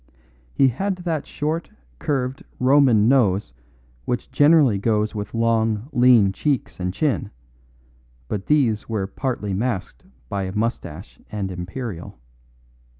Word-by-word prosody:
He 135 - +5
had 190 - -2
that 170 -5 -3
short, 155 +3 -3 0.3
curved 130 -2 -2 0.2
Roman 125 -5 +5
nose 105 - +2 0.5
which 120 - -3
generally 145 -8 +5
goes 105 0 0
with 105 0 -5
long, 115 0 +1
lean 120 -6 +5
cheeks 140 +1 -2
and 90 0 -1
chin, 130 0 -1 1.0
but 95 +6 -4
these 120 -9 +2
were 105 -4 -1
partly 105 -1 -3
masked 95 - -3 0.2
by 95 +5 -3
moustache 95 -4 -4
and 100 -3 -3
imperial. 90 - -6
115 Hz, 115 wpm, -22 LUFS, 100-135 Hz, 1.0 s, He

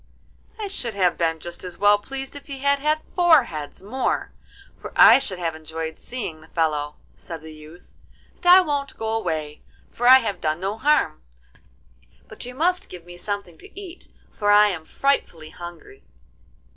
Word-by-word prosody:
'I 425 - -3
should 250 - -4
have 185 -3 +2
been 165 -1 0
just 175 +2 -8
as 180 -1 -8
well 205 +1 +5
pleased 270 +5 -7
if 285 - -11
he 275 -2 -6
had 280 +1 +1
had 305 +2 0
four 340 -6 +6
heads 155 -4 -8
more, 255 +6 -2 0.4
for - - -10
I - - +8
should 200 -9 -3
have 170 -2 -2
enjoyed 160 0 -6
seeing 185 -11 -6
the 160 - -16
fellow,' 150 -3 -1 0.2
said 165 -2 -9
the 160 0 -10
youth; 155 +3 -15 0.4
'and - - -20
I 365 +1 +9
won't 285 -5 -3
go 220 0 -2
away, 160 -8 -3 0.3
for 245 - -1
I 260 +1 +10
have 225 -6 -3
done 155 +1 -1
no 195 +3 -2
harm, 285 - +2 1.1
but - - -10
you 250 - -9
must 360 +5 0
give 175 -2 -10
me 175 0 -11
something 180 -3 -6
to - - -12
eat, 370 -3 -12 0.2
for 205 0 +1
I 210 0 +7
am 170 -5 -5
frightfully 165 - -1
hungry. 175 - -11
205 Hz, 180 wpm, -23 LUFS, -, 1.1 s, I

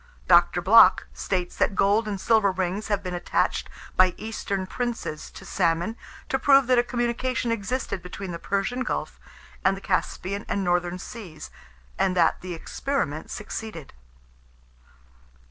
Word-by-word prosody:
Dr. 175 0 +5
Bloch 190 -1 +7
states 180 -2 -2
that 195 - +1
gold 205 +4 +3
and 200 -2 -3
silver 215 -1 +3
rings 185 +2 -2
have 205 -2 -1
been 180 -1 -4
attached 175 0 0 0.3
by 185 -1 +4
eastern 200 -3 -3
princes 235 -8 -4
to 195 - -12
salmon, 175 +3 0 0.3
to 265 - 0
prove 275 0 +5
that 250 0 +4
a - - +3
communication 240 0 -1
existed 230 -2 -2
between 180 +1 -7
the 170 - -5
Persian 200 +8 -1
Gulf 260 - -3 0.4
and 195 0 +3
the - - -7
Caspian 195 +1 -2
and 200 - 0
Northern 175 0 0
Seas, 185 -5 -9 0.5
and 185 -1 +1
that 165 -2 +3
the 180 -1 -5
experiment 160 - -3
succeeded. 215 -7 -7
195 Hz, 145 wpm, -25 LUFS, 180-230 Hz, 0.5 s, Bloch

